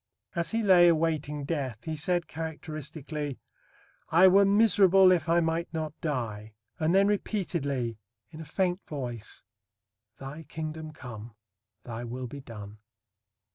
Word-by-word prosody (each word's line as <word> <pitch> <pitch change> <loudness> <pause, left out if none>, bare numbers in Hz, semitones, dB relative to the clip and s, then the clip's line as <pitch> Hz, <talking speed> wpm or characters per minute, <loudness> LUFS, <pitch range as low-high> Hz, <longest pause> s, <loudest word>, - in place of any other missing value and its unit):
As 170 -1 -1
he 225 0 0
lay 180 -3 +7
awaiting 155 -3 +1
death, 135 -8 -3
he 160 -1 -3
said 175 +3 0
characteristically, 155 -2 -5 0.7
"I 170 +4 +7
were 200 +2 +6
miserable 195 -2 +6
if 170 -3 +1
I 170 +1 +4
might 165 +1 -1
not 155 -2 -3
die," 110 -8 -3 0.2
and 160 +3 +2
then 195 +1 +6
repeatedly, 145 - -1 0.3
in 160 0 -9
a - - -8
faint 180 +4 0
voice, 120 -7 -6 0.7
"Thy 135 +4 -8
Kingdom 155 +1 -6
come, 115 -6 -10 0.5
Thy 120 0 -6
will 125 +2 -5
be 140 +3 -8
done." 105 -4 -10
155 Hz, 135 wpm, -28 LUFS, 130-175 Hz, 0.7 s, lay